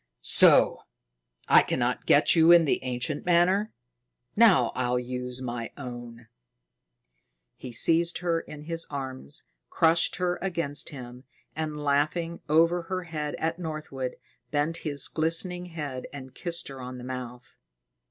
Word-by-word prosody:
"So! -, -, +6 dB, 0.7 s
I -, -, +7 dB
cannot -, -, -2 dB
get -, -, +5 dB
you 165 Hz, 0 st, +6 dB
in 170 Hz, -1 st, +7 dB
the 140 Hz, -, 0 dB
ancient 130 Hz, +4 st, -3 dB
manner. 180 Hz, +5 st, +2 dB, 0.6 s
Now 190 Hz, -, +5 dB
I'll 125 Hz, -1 st, 0 dB
use 125 Hz, +1 st, -5 dB
my 120 Hz, -2 st, -5 dB
own." 120 Hz, -3 st, -9 dB, 1.3 s
He 130 Hz, -, -9 dB
seized 165 Hz, +8 st, +2 dB
her 170 Hz, -2 st, 0 dB
in 150 Hz, -2 st, -10 dB
his 165 Hz, +1 st, -3 dB
arms 130 Hz, -, -6 dB, 0.3 s
crushed 165 Hz, 0 st, +2 dB
her 180 Hz, -1 st, -1 dB
against 165 Hz, -6 st, -2 dB
him, 125 Hz, -2 st, -10 dB, 0.3 s
and, 155 Hz, -1 st, -4 dB
laughing 155 Hz, +4 st, 0 dB
over 165 Hz, +3 st, +3 dB
her 185 Hz, +2 st, -4 dB
head 155 Hz, -3 st, -4 dB
at 165 Hz, +2 st, -3 dB
Northwood, 155 Hz, -6 st, -5 dB, 0.3 s
bent 150 Hz, +3 st, 0 dB
his 145 Hz, -3 st, -1 dB
glistening 175 Hz, +3 st, -1 dB
head 145 Hz, -7 st, -6 dB
and 130 Hz, -2 st, -10 dB
kissed 170 Hz, -1 st, -4 dB
her 135 Hz, -1 st, -9 dB
on 125 Hz, 0 st, -7 dB
the 125 Hz, -, -9 dB
mouth. 125 Hz, -1 st, -8 dB
150 Hz, 135 wpm, -27 LUFS, 130-170 Hz, 1.3 s, I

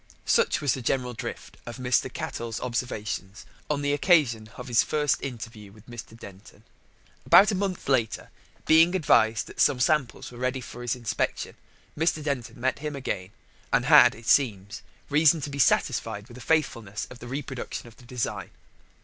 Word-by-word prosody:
Such 470 Hz, -, +2 dB
was 140 Hz, -5 st, +2 dB
the 130 Hz, -, -5 dB
general 125 Hz, +1 st, -1 dB
drift 120 Hz, 0 st, -7 dB
of 120 Hz, -, -7 dB
Mr. 125 Hz, 0 st, 0 dB
Cattell's 115 Hz, -2 st, -5 dB
observations 110 Hz, -5 st, -4 dB, 0.2 s
on 145 Hz, -1 st, -1 dB
the 145 Hz, 0 st, +1 dB
occasion 140 Hz, -, +2 dB
of 125 Hz, -, -8 dB
his 120 Hz, -2 st, +4 dB
first 150 Hz, -2 st, 0 dB
interview 115 Hz, -5 st, -7 dB
with 105 Hz, +1 st, -18 dB
Mr. 120 Hz, -1 st, -10 dB
Denton. 100 Hz, 0 st, -14 dB, 0.6 s
About 210 Hz, +3 st, +7 dB
a -, -, -1 dB
month 190 Hz, -1 st, -3 dB
later, 125 Hz, -5 st, 0 dB, 0.3 s
being 165 Hz, +3 st, +5 dB
advised 115 Hz, -, +3 dB
that -, -, -5 dB
some 130 Hz, -, +4 dB
samples 135 Hz, -1 st, 0 dB
were 120 Hz, -, -11 dB
ready 130 Hz, +1 st, -1 dB
for 120 Hz, -1 st, -9 dB
his 120 Hz, -1 st, -1 dB
inspection, 120 Hz, -3 st, -3 dB, 0.4 s
Mr. 160 Hz, 0 st, 0 dB
Denton 140 Hz, -5 st, -4 dB
met 130 Hz, +2 st, -1 dB
him 150 Hz, 0 st, -4 dB
again, 100 Hz, -9 st, -4 dB, 0.4 s
and -, -, +2 dB
had, -, -, +7 dB
it 115 Hz, +1 st, -14 dB
seems, 105 Hz, -6 st, +1 dB, 0.3 s
reason 155 Hz, +2 st, +5 dB
to 145 Hz, -, -5 dB
be 140 Hz, -, -6 dB
satisfied 115 Hz, -5 st, +1 dB
with 120 Hz, -, -14 dB
the 125 Hz, -, -11 dB
faithfulness 115 Hz, -9 st, -1 dB
of 125 Hz, -, -11 dB
the 120 Hz, -, -9 dB
reproduction 135 Hz, -2 st, -6 dB
of 115 Hz, -, -16 dB
the 125 Hz, -, -17 dB
design. 120 Hz, -2 st, -4 dB
125 Hz, 175 wpm, -26 LUFS, 115-145 Hz, 0.6 s, About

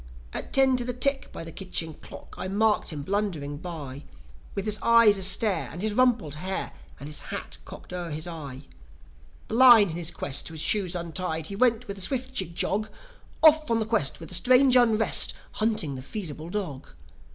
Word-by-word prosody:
At -, -, -5 dB
ten 265 Hz, -1 st, +4 dB
to 245 Hz, -, +1 dB
the 250 Hz, +1 st, -3 dB
tick, 270 Hz, +2 st, +1 dB
by -, -, -8 dB
the 165 Hz, -, -9 dB
kitchen 165 Hz, -3 st, -3 dB
clock, -, -, -12 dB
I -, -, -5 dB
marked 210 Hz, +2 st, +1 dB
him 150 Hz, -4 st, -5 dB
blundering 170 Hz, -6 st, -3 dB
by, 150 Hz, -5 st, -8 dB, 0.5 s
With 195 Hz, -, -3 dB
his 215 Hz, -1 st, 0 dB
eyes 230 Hz, -3 st, +5 dB
astare, 195 Hz, +2 st, +2 dB
and 165 Hz, -, -8 dB
his 215 Hz, -1 st, 0 dB
rumpled 235 Hz, -, +2 dB
hair, 185 Hz, +6 st, -4 dB, 0.3 s
and 140 Hz, -, -8 dB
his 150 Hz, -1 st, -6 dB
hat -, -, -7 dB
cocked -, -, -11 dB
over 175 Hz, -2 st, -4 dB
his 155 Hz, +1 st, -4 dB
eye. 145 Hz, -5 st, -8 dB, 0.8 s
Blind, 230 Hz, -5 st, +6 dB
in 160 Hz, -, -5 dB
his 170 Hz, -2 st, -2 dB
pride, 135 Hz, -, -6 dB
to 160 Hz, -, +1 dB
his 160 Hz, -, -7 dB
shoes 190 Hz, -4 st, +1 dB
untied, 170 Hz, -2 st, -2 dB
he 200 Hz, -, -5 dB
went 240 Hz, +1 st, +1 dB
with 200 Hz, 0 st, -6 dB
a -, -, -4 dB
swift 260 Hz, +5 st, -1 dB
jig 180 Hz, -7 st, -1 dB
jog, 215 Hz, +5 st, -1 dB, 0.5 s
Off 310 Hz, -1 st, +6 dB
on 230 Hz, -, +2 dB
the 220 Hz, -, -1 dB
quest, 220 Hz, -11 st, 0 dB
with 165 Hz, -, -9 dB
a -, -, -3 dB
strange 255 Hz, +8 st, +4 dB
unrest, 225 Hz, -3 st, +3 dB, 0.2 s
hunting 215 Hz, -10 st, 0 dB
the 130 Hz, -, -7 dB
Feasible 160 Hz, 0 st, -6 dB
Dog. 175 Hz, -9 st, -5 dB
195 Hz, 195 wpm, -26 LUFS, 160-230 Hz, 0.8 s, Blind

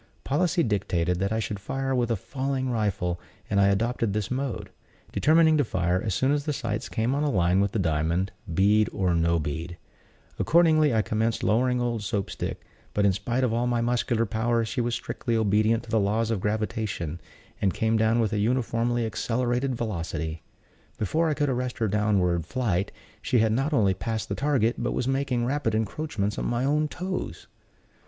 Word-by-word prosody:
Policy 170 Hz, +4 st, +1 dB
dictated 90 Hz, -5 st, 0 dB
that 100 Hz, +2 st, 0 dB
I 110 Hz, -, 0 dB
should 105 Hz, -2 st, -3 dB
fire 135 Hz, +6 st, -2 dB
with 120 Hz, -2 st, +1 dB
a 115 Hz, -, +2 dB
falling 130 Hz, +4 st, -2 dB
rifle, 100 Hz, -6 st, -1 dB, 0.3 s
and 100 Hz, -1 st, +3 dB
I 100 Hz, -, +5 dB
adopted 115 Hz, +2 st, +1 dB
this 105 Hz, +1 st, -2 dB
mode; 125 Hz, -7 st, -3 dB, 0.4 s
determining 160 Hz, 0 st, +4 dB
to 145 Hz, -, +3 dB
fire 90 Hz, -4 st, 0 dB
as 105 Hz, -4 st, -1 dB
soon 130 Hz, +1 st, +2 dB
as 145 Hz, -1 st, +1 dB
the 150 Hz, -, 0 dB
sights 115 Hz, -6 st, -3 dB
came 115 Hz, +4 st, 0 dB
on 145 Hz, -, 0 dB
a 150 Hz, -, +1 dB
line 90 Hz, -5 st, +2 dB
with 100 Hz, -1 st, +1 dB
the -, -, -2 dB
diamond, 85 Hz, +2 st, 0 dB, 0.2 s
bead 105 Hz, +5 st, +3 dB
or 90 Hz, -2 st, +1 dB
no 85 Hz, 0 st, +2 dB
bead. 80 Hz, +3 st, -4 dB, 0.6 s
Accordingly, 155 Hz, -3 st, +4 dB
I 110 Hz, -2 st, +2 dB
commenced 110 Hz, +3 st, -1 dB
lowering 125 Hz, +3 st, +2 dB
old 120 Hz, -2 st, -1 dB
Soap 100 Hz, -1 st, -2 dB
stick; -, -, -5 dB, 0.3 s
but, 105 Hz, -, +3 dB
in 100 Hz, -, +4 dB
spite 120 Hz, +7 st, -1 dB
of 120 Hz, -3 st, +1 dB
all 120 Hz, +1 st, +1 dB
my 120 Hz, -1 st, +1 dB
muscular 120 Hz, -1 st, +1 dB
powers, 115 Hz, +2 st, 0 dB
she 125 Hz, -, -1 dB
was 120 Hz, 0 st, 0 dB
strictly 120 Hz, -1 st, -3 dB
obedient 110 Hz, +1 st, +2 dB
to 115 Hz, -, -11 dB
the 110 Hz, -, +3 dB
laws 110 Hz, +3 st, +1 dB
of 105 Hz, -5 st, -1 dB
gravitation, 105 Hz, -6 st, -2 dB, 0.4 s
and 95 Hz, -, +3 dB
came 110 Hz, +3 st, 0 dB
down 110 Hz, +1 st, +3 dB
with 110 Hz, -2 st, +1 dB
a 105 Hz, -, +1 dB
uniformly 120 Hz, +1 st, 0 dB
accelerated 125 Hz, +4 st, -1 dB
velocity. 85 Hz, -7 st, -3 dB, 0.6 s
Before 160 Hz, -, +1 dB
I 150 Hz, -, 0 dB
could 145 Hz, 0 st, +1 dB
arrest 125 Hz, -1 st, -2 dB
her 110 Hz, -, +1 dB
downward 95 Hz, -5 st, +1 dB
flight, 100 Hz, -8 st, -1 dB, 0.3 s
she 125 Hz, -, +1 dB
had 110 Hz, -1 st, +3 dB
not 135 Hz, +7 st, 0 dB
only 105 Hz, -10 st, +3 dB
passed 110 Hz, +2 st, -3 dB
the -, -, -1 dB
target, 125 Hz, -2 st, +1 dB
but 120 Hz, -, -1 dB
was 125 Hz, -, -1 dB
making 135 Hz, -3 st, 0 dB
rapid 130 Hz, -4 st, 0 dB
encroachments 110 Hz, -1 st, -2 dB
on -, -, -2 dB
my 120 Hz, +2 st, 0 dB
own 150 Hz, +2 st, +2 dB
toes. 185 Hz, +4 st, -5 dB
115 Hz, 190 wpm, -26 LUFS, 100-125 Hz, 0.6 s, I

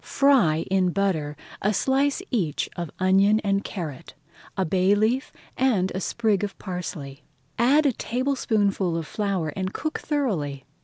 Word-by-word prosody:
Fry 220 Hz, -, +3 dB
in 190 Hz, -1 st, +3 dB
butter 165 Hz, -6 st, -1 dB, 0.2 s
a 210 Hz, +1 st, +1 dB
slice 275 Hz, -, +1 dB
each 175 Hz, -, 0 dB
of 170 Hz, -2 st, -4 dB
onion 195 Hz, +3 st, +4 dB
and 200 Hz, 0 st, 0 dB
carrot, 150 Hz, -9 st, -6 dB, 0.4 s
a 190 Hz, -, +1 dB
bay 185 Hz, +4 st, +3 dB
leaf, 225 Hz, +6 st, +1 dB, 0.2 s
and 215 Hz, -8 st, +2 dB
a 190 Hz, -, -3 dB
sprig 215 Hz, -1 st, 0 dB
of 205 Hz, -, -4 dB
parsley. 160 Hz, -7 st, -6 dB, 0.4 s
Add 280 Hz, +6 st, +4 dB
a 280 Hz, -, +4 dB
tablespoonful 215 Hz, -8 st, 0 dB
of 165 Hz, -, -3 dB
flour 195 Hz, -4 st, -2 dB
and 190 Hz, +5 st, -4 dB
cook 310 Hz, -, -3 dB
thoroughly. 170 Hz, -, -2 dB
195 Hz, 145 wpm, -25 LUFS, 175-235 Hz, 0.4 s, onion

